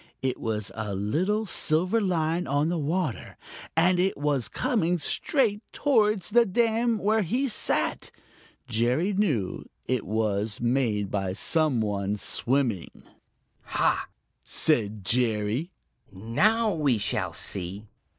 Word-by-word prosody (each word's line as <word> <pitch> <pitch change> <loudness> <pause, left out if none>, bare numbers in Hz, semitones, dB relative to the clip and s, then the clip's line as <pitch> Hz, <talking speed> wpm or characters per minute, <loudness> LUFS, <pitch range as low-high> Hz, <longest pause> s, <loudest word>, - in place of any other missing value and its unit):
It 130 -1 -1
was 110 -2 -2
a 105 -3 -4
little 180 - 0
silver 180 +4 +1
line 170 -2 0
on 145 +3 +1
the 175 - -1
water, 155 -2 -3 0.4
and 175 +2 +4
it 190 +2 +1
was 145 -4 0
coming 210 - 0
straight 215 - +1
towards 215 -8 +1
the 240 +2 +6
dam 230 +2 +1
where 215 +3 +1
he 245 +9 0
sat. 220 - -1 0.6
Jerry 125 - +1
knew 150 - -1 0.2
that - - -1
it - - -9
was 105 0 0
made 120 -5 0
by 95 -2 -1
some 150 - +2
one 100 -1 -1
swimming. 120 -3 -1 0.6
"Ha!" - - 0 0.4
said 110 - +1
Jerry. 115 - 0 0.4
"Now 205 - +1
we 145 -7 +1
shall 100 -4 -1
see!" 95 +3 -2
145 Hz, 120 wpm, -26 LUFS, -, 0.6 s, the